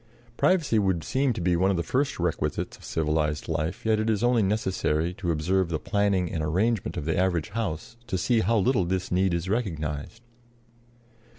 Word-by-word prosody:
Privacy 155 -11 +3
would 95 -5 +1
seem 135 - +1
to 90 - -5
be 90 0 +2
one 95 +3 +2
of 95 - +1
the 85 - 0
first 135 - 0
requisites 85 -2 -1
of - - -18
civilized 75 -1 -1
life, 80 +4 -2
yet 110 -1 +3
it 110 +1 0
is 110 0 +1
only 120 -1 +4
necessary 95 -5 0
to 90 -1 -4
observe 85 +3 +1
the 80 - 0
planning 100 -2 0
and 80 - -2
arrangement 100 +8 0
of 70 - -3
the 80 - 0
average 90 -3 +1
house 105 0 -4
to 95 - -1
see 115 +6 +2
how 110 +3 +2
little 105 0 +2
this 95 +1 -2
need 95 +1 +2
is 85 +1 -2
recognized. 90 -2 -3
95 Hz, 190 wpm, -26 LUFS, 80-110 Hz, -, only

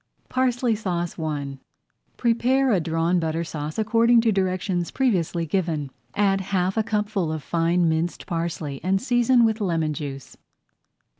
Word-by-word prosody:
PARSLEY 250 -2 +1
SAUCE 175 -6 -3
I 145 -4 -3 0.6
Prepare 250 +3 +2
a 195 - +3
Drawn 165 +2 +1
Butter 165 0 -1
Sauce 155 -2 -5
according 230 +2 +4
to 225 -1 +2
directions 185 -2 -1
previously 180 -10 0
given, 160 -5 -1 0.2
add 195 -1 +2
half 190 0 0
a 220 - +2
cupful 210 -5 -1
of 155 -2 -4
fine 170 +2 +1
minced 160 +2 -1
parsley, 165 -5 -3
and 190 +2 +2
season 245 0 +3
with 220 0 0
lemon 165 -5 0
juice. 140 -2 -7
180 Hz, 140 wpm, -24 LUFS, 165-220 Hz, 0.6 s, according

